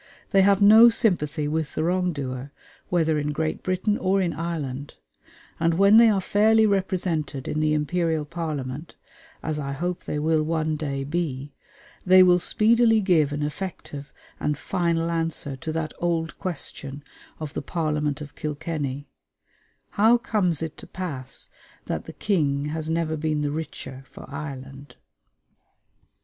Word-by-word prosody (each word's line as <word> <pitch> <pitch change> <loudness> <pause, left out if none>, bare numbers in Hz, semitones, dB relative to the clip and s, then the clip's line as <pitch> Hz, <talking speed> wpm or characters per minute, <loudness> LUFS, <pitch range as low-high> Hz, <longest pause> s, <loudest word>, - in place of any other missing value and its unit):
They 195 - +5
have 200 +1 +4
no 220 +3 +9
sympathy 155 -10 0
with 155 -1 -2
the - - 0
wrong 180 +1 +1
doer, 135 -2 -5 0.4
whether 160 -3 +2
in 150 0 -1
Great 155 +1 -2
Britain 185 +3 0
or 190 +1 +2
in 180 -3 0
Ireland; 145 -4 -4 0.6
and 165 0 +2
when 200 +4 +6
they 230 0 +8
are 205 -2 +2
fairly 220 +3 +4
represented 180 -8 -1
in 155 - -1
the 155 0 +2
Imperial 160 0 0
Parliament, 150 -3 -5 0.5
as 155 -1 -2
I 140 -1 -3
hope 175 +5 -3
they - - -3
will 155 +1 +2
one 155 0 0
day 140 -3 -3
be, 145 -3 -3 0.5
they 185 0 +7
will 180 -1 +5
speedily 225 +4 +4
give 170 -8 +3
an 145 0 -2
effective 150 -2 -6 0.3
and 150 -1 -1
final 170 -1 0
answer 165 -4 -2
to 155 +4 -5
that 160 -1 -3
old 165 -1 -1
question 145 -5 -4 0.4
of 155 -2 -6
the - - -3
Parliament 150 -2 -1
of 145 -1 -8
Kilkenny 145 -2 -4 0.8
"How 225 +4 +5
comes 185 - 0
it 160 -1 -6
to - - -11
pass 145 -9 -6 0.3
that - - -3
the - - -9
King 145 -8 0
has 160 0 -4
never 160 -1 0
been 155 -1 -1
the 145 - -1
richer 140 -4 -6
for - - -12
Ireland?" 140 -1 -8
160 Hz, 150 wpm, -25 LUFS, 145-180 Hz, 0.8 s, no